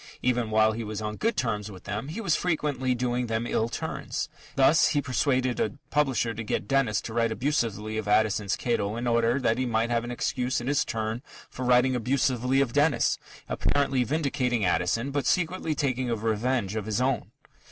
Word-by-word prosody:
Even 120 -2 +1
while 110 0 +4
he 115 +1 -4
was 105 -1 -5
on 105 0 -3
good 230 - -1
terms 110 -5 -1
with 95 -3 -11
them, 105 +6 -4
he 160 +9 -5
was 180 -8 +1
frequently 145 -7 0
doing 125 0 -1
them 115 +1 -1
ill 115 -1 0
turns. - - -4 0.3
Thus, 135 +4 +5
he 145 - +1
persuaded 130 -2 0
a 110 - -1
publisher 135 -6 +1
to 115 +2 -5
get 100 -3 -2
Dennis 125 -5 +2
to 110 - -7
write 115 -1 +1
abusively 110 -5 -1
of 105 - -5
Addison's 105 -1 +2
Cato 110 -3 -1
in 120 +1 -3
order 115 +2 +2
that 115 -2 +1
he 130 - 0
might 115 0 0
have 115 0 +1
an 120 - -6
excuse 125 +1 -1
in 120 - -6
his 145 +2 +2
turn 110 +1 -3 0.3
for 130 - -6
writing 125 +1 +4
abusively 130 +1 +1
of 125 -4 0
Dennis, 145 +1 +2 0.3
apparently 140 -3 +1
vindicating 130 -6 0
Addison 115 +9 +1
but 140 -3 -1
secretly 165 -2 0
taking 130 -3 -1
a 115 - +1
revenge 110 0 -1
of 110 -1 -3
his 110 +1 0
own. 130 0 0
120 Hz, 195 wpm, -27 LUFS, 110-135 Hz, 0.3 s, Thus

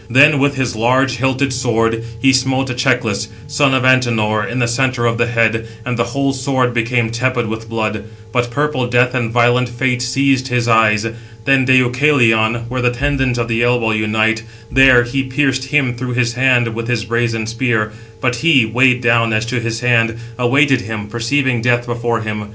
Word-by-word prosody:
Then, 140 +4 +5
with 140 +1 +1
his 130 -4 -2
large 125 +3 +1
hilted 130 +2 0
sword, 115 -2 -1 0.2
he 135 +2 +3
smote 130 0 0
Echeclus, 120 -5 -1 0.2
son 145 -2 +1
of 130 - 0
Antenor, 115 -5 +2
in 120 - -5
the 120 -2 +1
centre 125 0 -1
of 115 0 0
the 120 - +1
head, 115 -1 0 0.2
and 125 -1 -2
the 115 -1 0
whole 135 +3 -2
sword 130 -2 -1
became 120 0 0
tepid 120 0 -1
with 110 +1 -6
blood; 110 -2 -3 0.3
but 120 0 -1
purple 140 0 -1
Death 125 +1 +2
and 120 -3 -1
violent 120 +1 +2
Fate 125 +1 -1
seized 130 +1 0
his 125 -2 -1
eyes. 110 -2 +3 0.4
Then 135 -1 +3
Deucalion, 125 -3 +2
where 125 +1 -3
the 125 - +2
tendons 130 0 -1
of 120 -1 -2
the 115 0 -1
elbow 120 -2 +1
unite, 110 +1 0 0.3
there 130 -1 +5
he 120 +3 -2
pierced 130 0 -1
him 135 -3 0
through 125 +1 -5
his 120 -1 0
hand 120 -2 +1
with 115 0 -5
his 120 -4 -2
brazen 115 0 -1
spear; 115 -1 -1 0.3
but 125 -2 0
he, 140 -3 +3
weighed 125 +2 +2
down 115 -1 +2
as 110 +1 0
to 120 +1 -2
his 115 0 -4
hand, 115 -2 +2 0.2
awaited 135 +1 +2
him, 110 -2 -6
perceiving 120 +2 -1
death 120 0 +1
before 120 -1 -2
him. 105 -1 -5
120 Hz, 185 wpm, -16 LUFS, 115-130 Hz, 0.4 s, Then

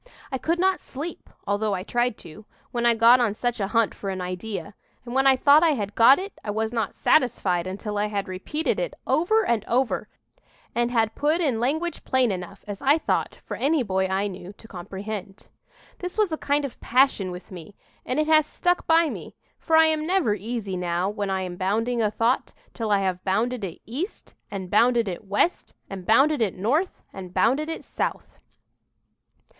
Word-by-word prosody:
"I 265 - -2
could 335 +5 0
not 375 +1 +2
sleep, 305 +5 -8 0.2
although 205 0 0
I 185 - -4
tried 240 +2 0
to, 170 +7 -12 0.3
when 240 -1 +1
I 235 - +4
got 230 +3 +6
on 225 -4 +1
such 240 +1 -2
a 195 - 0
hunt 225 0 +1
for 195 - -6
an 190 -1 -3
idea; 185 +3 -5 0.3
and 240 - -7
when 270 +1 +3
I 265 - +7
thought 285 +4 +6
I 330 -2 +4
had 205 -6 -3
got 235 +5 +7
it, 390 +2 -6
I - - -6
was 220 +2 -1
not 225 -4 -2
satisfied 185 - +2
until 205 +2 -4
I 210 - +1
had 205 -2 -3
repeated 195 - -2
it - - -3
over 435 +8 +2
and 230 -3 +1
over, 250 +2 0 0.6
and 240 0 +1
had 225 -2 +1
put 305 +3 +1
in 275 -10 +1
language 315 +8 -1
plain 260 -4 +2
enough, 185 +1 -6
as 205 -1 -6
I 280 +3 +4
thought, - - -1
for - - -5
any 290 0 +1
boy 190 -3 0
I 190 +2 0
knew 190 -1 -7
to 225 - -15
comprehend. 195 +1 -7 0.5
"This 360 +2 -6
was 425 -5 +2
a - - 0
kind 290 0 0
of 270 - -7
a - - -39
passion 250 -7 +2
with 180 +2 -9
me, 185 +2 -10 0.3
and 255 - -2
it 305 - +2
has 310 -1 +4
stuck 355 0 0
by 330 0 +5
me; - - -7 0.2
for 320 -1 +2
I 320 - +7
am 315 -1 0
never 360 - +2
easy 210 -1 -4
now 180 +1 -1
when 205 -1 -3
I 190 -1 -1
am 180 -1 -6
bounding 225 +6 0
a 215 - +2
thought, 230 +4 0 0.2
till 225 -3 -3
I 200 -1 +3
have 185 -1 -2
bounded 225 +5 0
it 180 -4 -5
east, 295 - -6 0.2
and 195 -2 -5
bounded 235 +1 +4
it 185 +2 -5
west, 205 - 0 0.2
and 190 -2 -7
bounded 275 +5 +4
it 205 -5 0
north, 275 - -1
and 185 -2 -8
bounded 280 +7 +2
it 325 - -5
south." - - -4
225 Hz, 205 wpm, -25 LUFS, 195-280 Hz, 0.6 s, I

